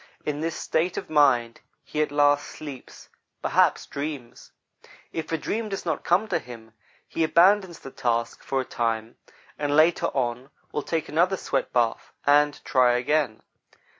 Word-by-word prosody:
In 150 0 -2
this 165 +1 -2
state 170 +3 -1
of 190 - -5
mind, 125 -6 +3 0.2
he 155 - -2
at 150 - 0
last 145 0 +3
sleeps, 145 -4 -10 0.3
perhaps - - +2
dreams. 140 -4 -7 0.6
If 160 - -4
a 165 - +1
dream 215 +7 -3
does 195 -2 -5
not 160 -4 -2
come 185 +6 +2
to 185 - +1
him, 115 -2 -12 0.3
he 165 - -1
abandons 180 +2 +4
the 135 - -10
task 115 -2 -1
for 135 - -2
a - - -6
time, 115 -1 -2 0.4
and 145 -1 0
later 160 +3 +4
on 125 0 -2 0.2
will 150 - -2
take 160 +2 -2
another 175 +5 +2
sweatbath 120 -8 -1
and 145 0 +3
try 125 -2 +4
again. 125 -2 0
145 Hz, 155 wpm, -25 LUFS, 125-165 Hz, 0.6 s, abandons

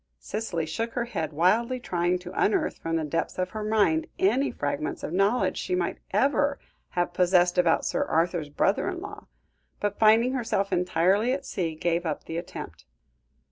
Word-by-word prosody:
Cicely 195 -7 -3
shook 230 +9 -3
her 240 -1 -1
head, 160 -10 -3
wildly 220 - +2
trying 175 -5 0
to 180 - -7
unearth 210 - +1
from 165 0 -2
the 160 - 0
depths 165 +2 -2
of 185 0 -2
her 215 -1 -4
mind, 220 +10 +2
any 285 -8 +2
fragments 145 +1 -3
of - - -4
knowledge 200 +6 +2
she 365 - -1
might 365 - -2
ever 285 0 +2 0.4
have 175 0 +1
possessed 180 0 +3
about 170 -2 +3
Sir - - 0
Arthur's 165 -2 0
brother 145 - +1
in - - -4
law; - - -9 0.5
but 205 -1 -2
finding 225 +4 +5
herself 225 -6 -1
entirely 185 +7 +2
at 275 0 -4
sea, 165 -4 -2
gave 170 +2 0
up 160 -3 -3
the 165 - -5
attempt. 170 - -7
185 Hz, 175 wpm, -26 LUFS, 170-230 Hz, 0.5 s, finding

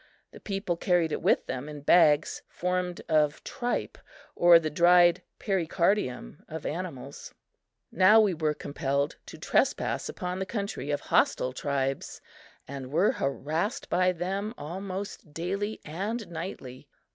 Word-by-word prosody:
The - - -12
people 195 -4 -3
carried 175 -3 +1
it - - -2
with - - +2
them 130 +3 -5
in 150 -1 -8
bags 150 -1 +4
formed 180 0 -2
of 155 -2 +2
tripe 245 -2 -3 0.4
or 175 0 +7
the 155 -2 -2
dried 175 +2 +5 0.2
pericardium 170 - -1
of 160 -1 -7
animals. 165 -5 -6 0.6
Now 195 +4 +6
we 210 -4 +3
were 155 -2 -1
compelled 140 -1 -2
to - - -9
trespass - - 0
upon 180 +1 -4
the 190 - -3
country 200 - -4
of 145 - -1
hostile 130 - +1
tribes 135 0 -2 0.5
and 135 -1 -7
were 175 +7 +3
harassed 155 - -2
by 185 0 +3
them 195 +5 -3
almost 185 -1 -6
daily 195 +5 -3
and 205 +8 -4
nightly. 160 -7 -7
170 Hz, 135 wpm, -28 LUFS, 150-190 Hz, 0.6 s, or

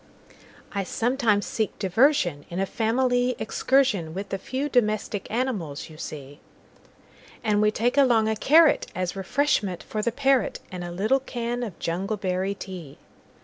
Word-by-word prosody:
I 200 -2 -1
sometimes 225 0 +1
seek 220 -2 -2
diversionIn 185 - +1
a 195 - +1
family 245 +3 +1
excursionWith 205 -8 +1
the 195 - -3
few 265 +8 -3
domestic 215 -6 0
animals 205 - -3
you 155 - -12
see; 145 -1 -8 1.0
And 210 -2 +2
we 215 - +4
take 235 +5 0
along 235 -5 +4
a 220 - +1
carrotAs 265 - +3
refreshment 200 - 0
for 215 - -3
the 235 - 0
parrot, 270 +1 +1
And 180 -1 -5
a 175 - -5
little 215 +10 +1
can 240 -2 -4
of 215 -8 -5
jungleberry 190 +1 -2
tea. 180 -9 -8
215 Hz, 135 wpm, -25 LUFS, 185-245 Hz, 1.0 s, we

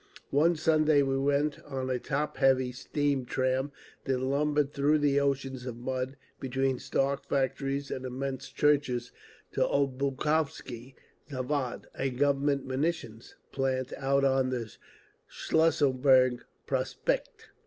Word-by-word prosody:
One 160 +5 +4
Sunday 155 -2 +3
we 135 0 0
went, 145 +2 +1
on 130 -2 -4
a 125 - 0
top 150 +3 -2
heavy 130 -2 +3
steam 140 +1 -1
tram 130 +2 0 0.3
that 135 -1 +1
lumbered 145 +2 +1
through 145 +2 +3 0.2
oceans 135 -2 -1
of 120 -2 -5
mud, 130 +2 -3 0.2
between 135 0 0
stark 140 0 0
factories 135 +1 -1
and 130 - -4
immense 130 +1 -4
churches, 140 -5 +1 0.4
to - - -2
Obukhovsky 135 -1 -1 0.3
Zavod, 130 -1 -2
a 135 - -1
Government 140 +1 +1
munitions 130 -4 -3 0.2
plant 130 -1 -1
out 140 0 +1
on 130 -1 +2
the 120 -4 -4 0.6
Schlüsselburg 130 -5 +3 0.3
Prospekt. - - -2
135 Hz, 115 wpm, -29 LUFS, 130-145 Hz, 0.6 s, One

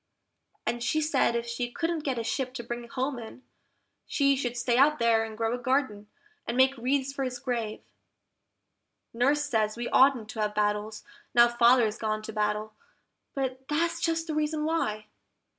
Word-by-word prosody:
And 235 +1 -2
she 275 +6 +1
said 295 -6 +2
if 235 0 -1
she 235 +1 -3
couldn't 335 +4 -2
get 270 -4 -1
a 230 - -2
ship 255 +3 -2
to 240 - -5
bring 240 +1 -5
him - - -17
home 260 +1 -2
in, 235 +3 -10 0.6
she 275 -1 +2
should 245 -2 -3
stay 240 0 +1
out 290 +4 +5
there 230 -1 +3
and 220 -1 -7
grow 225 0 0
a 245 - -3
garden, 245 -5 -1 0.4
and 235 - -2
make 260 +1 +4
wreaths 265 +2 -1
for 275 - -3
his 250 -1 -3
grave. 240 -4 -3 1.3
Nurse 275 +5 +2
says 220 -5 0
we 240 0 -3
oughtn't 260 -5 +4
to 220 - -4
have 210 0 -1
battles, 210 +1 -1 0.3
now 240 0 +8
Father's 235 -2 +3
gone 215 -1 -2
to 220 - -7
battle, 210 0 -1 0.6
but 265 -1 -3
that's 335 +3 0
just 325 -1 0
the 320 - -4
reason 305 0 -1
why! 215 -10 -1
245 Hz, 180 wpm, -28 LUFS, 225-275 Hz, 1.3 s, now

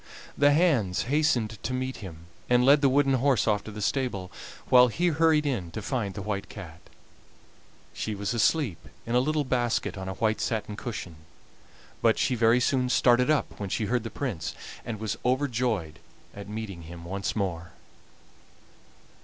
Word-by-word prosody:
The 145 0 +5
hands 145 - +2
hastened 125 -6 0
to 130 - -3
meet 130 +1 -3
him, 85 -5 -10 0.2
and 125 0 +4
led 140 +2 +6
the 140 - +5
wooden 135 0 +3
horse 130 -1 +2
off 105 -2 +2
to 110 - -7
the 105 0 -5
stable, 100 -7 -1 0.4
while 125 0 +7
he 175 +9 +1
hurried 160 -1 +3
in 115 -12 -2
to 110 - -4
find 110 -6 -2
the 100 - -5
White 100 -1 -3
Cat. 85 -5 -10 1.1
She 110 - -3
was 100 +3 -2
asleep 120 - +1 0.3
in 115 - -3
a 125 - +5
little 150 +3 +1
basket 120 -6 -1
on 95 0 -5
a 95 - -5
white 110 +2 0
satin 110 -2 -2
cushion, 105 -8 -6 0.8
but - - +4
she - - +1
very 115 0 +4
soon 125 0 +1
started 125 +1 +4
up 155 -2 0
when 100 -2 -4
she 110 - -1
heard 120 +3 0
the 115 - -6
Prince, 110 - -4 0.3
and 110 -3 -5
was 110 0 -3
overjoyed 120 - 0 0.3
at 100 -1 -9
seeing 105 -4 -6
him 85 +1 -10
once 95 +2 -3
more. 85 -5 -3
115 Hz, 170 wpm, -27 LUFS, 100-130 Hz, 1.1 s, while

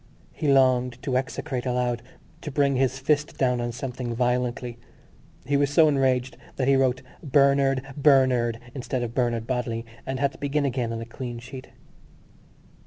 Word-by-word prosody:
He 150 -3 0
longed 125 -2 +3
to 135 -3 -1
execrate 130 0 -2
aloud, 125 -1 0 0.4
to - - -5
bring 140 -1 +2
his 130 0 +1
fist 145 +2 0
down 125 -2 +1
on 120 0 -2
something 125 -1 -5
violently. 125 0 -1 0.7
He 140 - 0
was 140 0 +2
so 155 +2 +5
enraged 130 -3 +1 0.2
that 130 - -1
he 135 - +5
wrote 130 -1 +1 0.2
Bernard 140 -2 +3
Bernard 130 -5 +3
instead 130 -2 -3
of 115 -1 -4
Bernard 120 -3 0
Bodley 120 -2 -2 0.2
and 130 0 -4
had 140 -1 +1
to - - -15
begin 145 0 0
again 125 -3 -1
on 115 0 -4
a - - -5
clean 120 0 -6
sheet. 130 +2 -10
130 Hz, 165 wpm, -25 LUFS, 120-140 Hz, 0.7 s, so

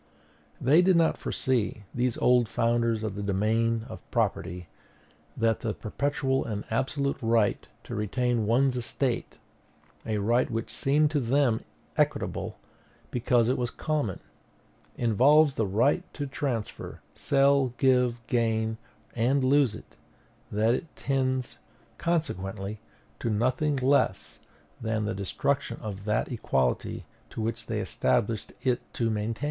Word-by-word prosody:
They 145 +7 +5
did 185 0 +4
not 165 -1 +3
foresee, 120 -5 -1
these 125 -1 0
old 125 -3 +3
founders 115 -1 +1
of 110 -3 -2
the 100 - -5
domain 110 +3 +1
of - - -8
property, 90 -1 -1 0.7
that 115 -1 +2
the 110 -3 -3
perpetual 135 +3 -1
and 105 -2 -4
absolute 140 +4 0
right 115 -2 +1 0.2
to - - -8
retain 115 +1 0
one's 130 +3 +3
estate, 125 +1 -2 0.7
a 110 -1 -1
right 115 +5 +2
which 115 0 -4
seemed 150 +2 +2
to 150 - +1
them 125 -2 +2 0.4
equitable, - - 0 0.5
because 120 -1 +2
it 125 - +1
was 120 -1 0
common, 145 - -2 0.8
involves 135 +6 +5
the 110 -5 0
right 120 - +2
to 145 - -3
transfer, 135 -5 -4
sell, 140 -2 +3
give, 125 -3 +2
gain, 110 -2 0 0.4
and 130 +4 +2
lose 135 -3 +3
it; - - -13 0.6
that 110 +3 +2
it 155 +5 -4
tends, 130 -2 -1 0.4
consequently, 105 - -2 0.4
to 115 - -2
nothing 130 +7 +1
less 135 +2 +1 0.4
than 110 -1 -1
the 105 - -1
destruction 100 +8 -1
of 100 -3 -6
that 105 +3 0
equality 65 - -1 0.3
which 115 0 -3
they - - -1
established 100 - 0
it 125 -2 +1
to 115 -2 +1
maintain. 110 +1 -2
120 Hz, 130 wpm, -28 LUFS, 110-135 Hz, 0.8 s, They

